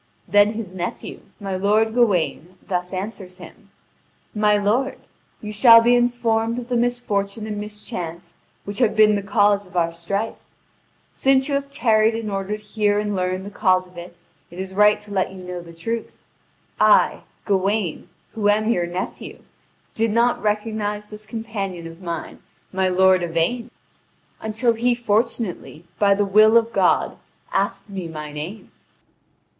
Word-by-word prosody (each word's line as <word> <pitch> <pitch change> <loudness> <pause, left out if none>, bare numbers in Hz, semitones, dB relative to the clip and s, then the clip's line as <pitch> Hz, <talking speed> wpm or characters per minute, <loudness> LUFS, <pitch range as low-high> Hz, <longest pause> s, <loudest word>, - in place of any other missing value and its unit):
Then 205 +1 +4
his 215 -5 -6
nephew, 175 -1 -5 0.2
my 195 -2 -4
lord 210 +4 +2
Gawain, 185 -6 +1
thus 180 -1 -2
answers 190 -1 -6
him: - - -14 0.6
"My 210 -1 +3
lord, 240 +7 0 0.4
you 210 - -6
shall 230 +2 +8
be 235 +1 +4
informed 235 -1 +1
of 245 0 -6
the 245 - 0
misfortune 225 -4 -1
and 210 -1 -4
mischance 180 -5 -7 0.3
which 200 +2 -5
have 235 -4 +2
been 215 -1 +6
the 200 - -1
cause 205 0 +2
of 185 0 -8
our 170 -1 +2
strife. 195 +6 -3 0.7
Since 265 0 +2
you - - -1
have 280 0 -1
tarried 225 -5 +2
in 225 -2 -4
order 195 +2 -3
to 215 - -19
hear 210 -1 0
and 210 -1 -1
learn 185 0 -1
the 200 - -8
cause 185 -2 +2
of 180 0 -20
it, 175 0 -10 0.3
it 175 - -13
is 190 0 -5
right 210 +1 +4
to 210 - -11
let 190 -1 0
you - - -10
know 180 -1 -6
the 170 -1 -12
truth. 225 +8 -5 0.6
I, - - +4 0.2
Gawain, 195 -3 -1 0.2
who 210 -2 +1
am 215 +2 +2
your 175 -6 0
nephew, 180 +2 -6 0.5
did 225 +1 0
not 235 +3 +2
recognise 210 0 -2
this 215 0 -9
companion 205 -7 -5
of 165 +2 -10
mine, 170 -3 -6 0.3
my 190 0 +1
lord 185 0 +4
Yvain, 175 +9 -1 0.7
until 225 +2 +1
he 240 +2 +1
fortunately, 220 -7 -2
by 200 -1 +4
the 205 +1 +1
will 215 +3 +6
of 230 0 +1
God, - - +2 0.3
asked - - -1
me 190 -4 -6
my 150 -2 -7
name. 160 +9 -7
205 Hz, 160 wpm, -22 LUFS, 185-225 Hz, 0.7 s, shall